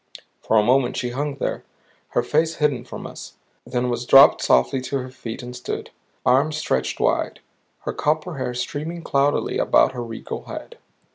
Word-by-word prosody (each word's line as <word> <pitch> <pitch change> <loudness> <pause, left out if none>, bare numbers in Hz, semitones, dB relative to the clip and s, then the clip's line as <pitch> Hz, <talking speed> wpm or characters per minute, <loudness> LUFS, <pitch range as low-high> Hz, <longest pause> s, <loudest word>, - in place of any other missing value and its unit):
For 110 - +2
a 105 - +5
moment 125 +3 +2
she 125 0 -2
hung 140 +3 -2
there, 135 - -3 0.5
her 120 - +4
face 160 +5 +1
hidden 150 -4 0
from - - -8
us; - - -9 0.3
then 125 0 -1
was 120 0 -2
dropped 135 0 +8
softly 65 - +3
to 140 +2 -2
her 130 -1 -6
feet 125 -3 -7
and 125 0 -7
stood, 125 - -5 0.3
arms 140 +5 +3
stretched 65 - -1
wide, - - 0 0.4
her - - -4
copper 155 +1 -1
hair 125 -1 -3
streaming 155 +7 -4
cloudily 140 0 +1
about - - +4
her 125 -2 -5
regal 115 -1 -7
head. - - -8
130 Hz, 170 wpm, -22 LUFS, 120-145 Hz, 0.5 s, dropped